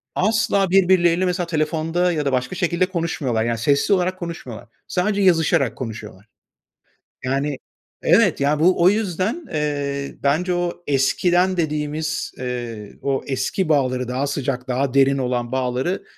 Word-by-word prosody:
asla 210 -1 +2
birbirleriyle, 180 -1 +4
mesela, 180 -1 -1
telefonda 165 +2 0
ya 150 -3 -2
da 140 - +1
başka 130 +5 -1
şekilde 175 +1 +1
konuşmuyorlar. 160 -10 -2
Yani, 115 0 -1
sesli 140 - +2
olarak 185 0 0
konuşmuyorlar. 125 -9 -7 0.2
Sadece 200 +3 0
yazışarak 160 -8 +2
konuşuyorlar. 110 -4 -7 1.0
Yani, 135 +2 -1 0.5
evet, 185 0 +4
ya, 145 +2 +2
bu 175 +2 +3
o 180 - +7
yüzden, 210 - -1
eee, 145 -2 -2
bence 160 +6 +1
o 175 0 -3
eskiden 175 +7 +2
dediğimiz, 155 0 -2
eee, 120 -4 -5
o 135 -1 -1
eski 140 +6 -1
bağları, 130 -4 +1
daha 130 +3 -1
sıcak, 135 -2 -3
daha 130 +1 -1
derin 135 0 +4
olan 125 -2 -2
bağları, 130 +7 -1
150 Hz, 135 wpm, -21 LUFS, 130-180 Hz, 1.0 s, o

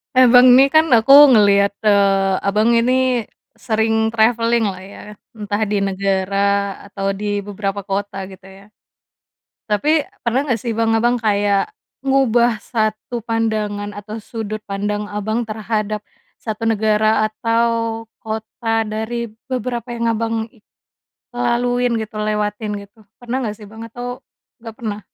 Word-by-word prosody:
Eh, 255 0 +7
Bang 250 0 +8
ini 265 - +8
kan 315 +2 +5
aku 230 +4 +5 0.2
ngeliat, 200 -1 +4
eee, 195 -2 +3
Abang 215 +3 +2
ini 250 -1 +1 0.3
sering 220 0 0
traveling-lah 230 -3 +1
ya, 200 - -12 0.4
entah 205 -1 -3
di 205 0 0
negara 195 0 -1 0.5
atau 195 -1 -3
di 205 +1 -3
beberapa 200 0 -4
kota 195 0 -3
gitu 190 -1 -14
ya. 195 +1 -15 1.1
Tapi 295 +9 +2 0.2
pernah 240 +2 +1
nggak 240 -3 +1
sih, 235 +2 -3
Bang, 225 0 +1
Abang 240 +2 +2
kayak 205 - +1 0.4
ngubah 240 -4 +3
satu 220 +1 -2
pandangan 215 -2 -2
atau 210 +1 -8
sudut 215 -1 -6
pandang 205 +1 -2
Abang 215 +3 -2
terhadap 215 -1 -3 0.4
satu 220 0 -5
negara 215 0 +2
atau 230 0 -1 0.2
kota 225 +1 -2
dari 220 +2 -3 0.2
beberapa 250 -1 -3
yang 235 0 -2
Abang 225 0 -2 1.0
laluin 245 0 0
gitu, 220 0 -7
lewatin 210 0 -2 0.2
gitu, 215 - -33 0.2
pernah 245 +1 -4
nggak 215 -2 -4
sih 210 - -11
Bang, 220 +1 -10
atau 245 +2 -7 0.5
nggak 225 -1 -8
pernah? 210 -3 -4
220 Hz, 130 wpm, -19 LUFS, 205-235 Hz, 1.1 s, Bang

